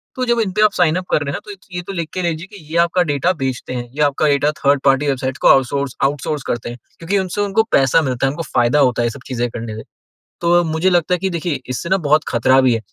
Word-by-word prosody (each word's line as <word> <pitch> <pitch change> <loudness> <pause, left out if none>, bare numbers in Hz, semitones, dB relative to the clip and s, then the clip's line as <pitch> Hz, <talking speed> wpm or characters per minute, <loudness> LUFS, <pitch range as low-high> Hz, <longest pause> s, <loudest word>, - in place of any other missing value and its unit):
तो 255 - -2
जब 240 -1 +1
इनपे 210 0 -1
आप 215 - +5
साइन 170 -3 +2
अप 185 - -4
कर - - +4
रहे 140 - -3
हैं - - -6
ना, - - -3
तो 190 -2 -19
ये 175 - -2
तो 195 - -7
लिख 170 -3 -4
के 185 - -2
लीजिए 170 +1 -2
कि 205 0 -13
ये 165 - -1
आपका 175 +1 +1
डेटा 145 +6 +1
बेचते 130 -1 -3
हैं, 120 - -3
ये 150 - -2
आपका 145 +1 +1
डाटा 145 +1 +2
थर्ड 140 -1 +3
पार्टी 135 +1 +3
वेबसाइट्स 130 -1 -2
को - - +3
आउटसोर्स 135 0 +2
आउटसोर्स 145 +1 -1
करते 120 0 -3
हैं, 120 - -8 0.2
क्योंकि 180 +5 -1
उनसे 190 +2 -2
उनको 205 +2 +2
पैसा 135 +3 +4
मिलता 130 -2 -1
है, 135 - 0
उनको 165 +3 -5
फ़ायदा 125 0 +1
होता 125 -3 +2
है - - +1
ये 115 - -2
सब 140 - -10
चीज़ें 120 -2 -2
करने 115 -2 -6
से। 110 - -7 0.6
तो 175 +1 +3
मुझे 160 +3 +1
लगता 175 -1 +2
है - - -6
कि 190 +2 -1
देखिए, 170 -3 -3
इससे 130 +7 -4
ना 190 - +3
बहुत 155 +1 +4
ख़तरा 130 +3 +3
भी 130 -2 +3
है, 115 - -2
150 Hz, 280 wpm, -18 LUFS, 130-175 Hz, 0.6 s, आप